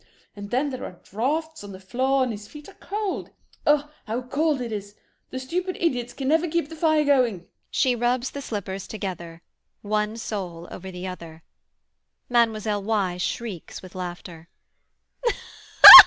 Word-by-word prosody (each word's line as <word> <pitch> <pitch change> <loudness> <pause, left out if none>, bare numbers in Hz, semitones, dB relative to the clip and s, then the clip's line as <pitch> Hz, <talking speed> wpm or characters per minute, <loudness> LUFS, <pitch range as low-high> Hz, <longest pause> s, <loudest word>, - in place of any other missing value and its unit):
And 205 0 -7
then 270 +6 +1
there 255 - -5
are 175 - -8
draughts 305 - -2
on 200 -1 -8
the 190 - -9
floor 260 +7 +1
and 250 - -1
his 205 -1 -7
feet 300 -1 -11
are - - -12
cold. 415 -1 -3 0.4
"Ugh, 295 0 +4 0.2
how 235 +4 -2
cold 290 +3 +1
it 240 -2 -4
is; 205 -1 -5 0.3
the - - -5
stupid 360 +8 -2
idiots 250 -8 0
can 270 - -4
never 325 +3 +3
keep 335 -2 0
the 325 - -8
fire 310 -1 +3
going." 245 -11 +3 0.2
[She 255 - +2
rubs 245 +2 0
the 280 - -5
slippers 195 -6 -4
together, 175 -5 -6 0.4
one 210 +1 0
sole 180 -7 -5
over 190 +1 -7
the 180 0 -6
other.] 165 -3 -8 0.9
MLLE. 220 -3 +2
Y. 200 -4 0
[Shrieks 190 -1 -4
with 185 - -11
laughter. 175 -2 -7
225 Hz, 155 wpm, -25 LUFS, 190-275 Hz, 0.9 s, Ugh